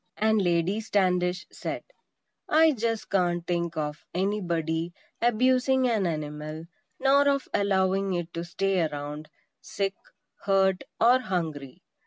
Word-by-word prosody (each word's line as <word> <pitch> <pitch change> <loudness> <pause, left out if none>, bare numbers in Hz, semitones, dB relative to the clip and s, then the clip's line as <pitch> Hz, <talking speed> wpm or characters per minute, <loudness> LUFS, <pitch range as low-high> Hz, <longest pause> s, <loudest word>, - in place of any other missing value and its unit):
And 220 0 +3
Lady 175 +3 +1
Standish 185 -3 +1
said: - - -5 0.7
"I 320 +1 +6
just 230 -4 -2
can't 175 -3 +1
think 170 -1 -2
of 150 0 -3
anybody 170 -4 -1 0.3
abusing 255 +2 +3
an 215 -6 +1
animal; 155 0 -5 0.3
nor 280 +2 +4
of 275 -1 0
allowing 195 -1 +1
it 175 0 -4
to 170 - -3
stay 190 +2 0
around, 150 0 -4 0.3
sick, 195 -1 -2 0.5
hurt 190 -1 +2
or 245 +3 +6
hungry. 160 - -4
190 Hz, 120 wpm, -27 LUFS, 165-220 Hz, 0.7 s, I